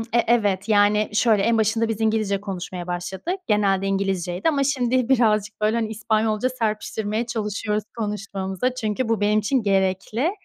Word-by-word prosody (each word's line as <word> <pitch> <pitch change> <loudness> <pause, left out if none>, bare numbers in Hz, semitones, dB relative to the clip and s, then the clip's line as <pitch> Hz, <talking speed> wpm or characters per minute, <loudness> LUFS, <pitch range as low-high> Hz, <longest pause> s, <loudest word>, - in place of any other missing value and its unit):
e 225 - -3 0.2
evet. 210 -4 +1
Yani, 210 0 +3
şöyle, 215 -2 +3
en 230 +1 +2
başında 220 +1 +1
biz 225 -1 -3
İngilizce 215 -3 +1
konuşmaya 185 -3 -6
başladık. 185 - -3
Genelde 195 -2 +2
İngilizceydi 195 - -1
ama 280 -3 +1
şimdi 255 -3 +1
birazcık, 215 -6 +2
böyle, 215 +2 +2
hani, 225 -2 -1
İspanyolca 220 +1 0
serpiştirmeye 220 -1 -2
çalışıyoruz 210 -2 -2
konuşmamıza 200 +2 -3
çünkü 225 0 -2
bu 225 -3 +1
benim 210 +1 +3
için 230 +4 +1
gerekli 195 - 0
215 Hz, 150 wpm, -23 LUFS, 195-230 Hz, 0.2 s, Yani